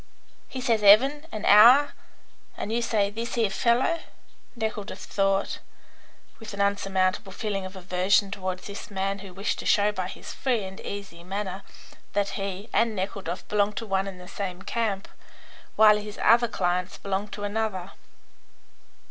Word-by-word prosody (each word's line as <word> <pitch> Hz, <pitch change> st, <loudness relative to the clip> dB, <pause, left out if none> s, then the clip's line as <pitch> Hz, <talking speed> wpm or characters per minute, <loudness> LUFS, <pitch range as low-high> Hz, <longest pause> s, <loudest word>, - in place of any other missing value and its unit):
"He 260 Hz, -, -5 dB
says 230 Hz, -3 st, +1 dB
''eaven' 270 Hz, +10 st, +6 dB
and 215 Hz, -, -5 dB
'hour,' 245 Hz, +8 st, +7 dB, 0.6 s
and 215 Hz, -, -4 dB
you 235 Hz, -, +1 dB
say 205 Hz, -3 st, +1 dB
'this 230 Hz, +3 st, -4 dB
here 225 Hz, -4 st, +1 dB
fellow,'" 245 Hz, +11 st, +2 dB, 0.6 s
Nekhludoff 220 Hz, -2 st, -4 dB
thought, 195 Hz, 0 st, 0 dB, 0.8 s
with 220 Hz, -3 st, -8 dB
an -, -, -10 dB
insurmountable 195 Hz, -1 st, 0 dB
feeling 195 Hz, -1 st, -3 dB
of 190 Hz, -, -13 dB
aversion 190 Hz, +2 st, +1 dB
towards 185 Hz, -2 st, -4 dB
this 200 Hz, +1 st, -8 dB
man 195 Hz, 0 st, -2 dB
who 195 Hz, -1 st, -10 dB
wished 195 Hz, +3 st, -2 dB
to -, -, -6 dB
show 205 Hz, 0 st, +4 dB
by 185 Hz, -3 st, -3 dB
his -, -, -8 dB
free 245 Hz, -6 st, 0 dB
and 190 Hz, 0 st, -8 dB
easy 195 Hz, -4 st, -7 dB
manner 195 Hz, +1 st, -4 dB, 0.5 s
that 200 Hz, 0 st, +1 dB
he 195 Hz, +1 st, -4 dB
and 230 Hz, -2 st, +2 dB
Nekhludoff 190 Hz, -2 st, -4 dB
belonged 210 Hz, 0 st, +1 dB
to 230 Hz, -, -3 dB
one 195 Hz, -1 st, 0 dB
and 190 Hz, -2 st, -7 dB
the 180 Hz, -, -11 dB
same 185 Hz, -1 st, -5 dB
camp, 220 Hz, -4 st, -2 dB, 0.7 s
while 215 Hz, -1 st, +7 dB
his 210 Hz, 0 st, -7 dB
other 235 Hz, +1 st, +5 dB
clients 180 Hz, -3 st, -1 dB
belonged 200 Hz, +1 st, -3 dB
to 205 Hz, -, -6 dB
another. 205 Hz, -3 st, -2 dB
200 Hz, 155 wpm, -26 LUFS, 190-220 Hz, 0.8 s, hour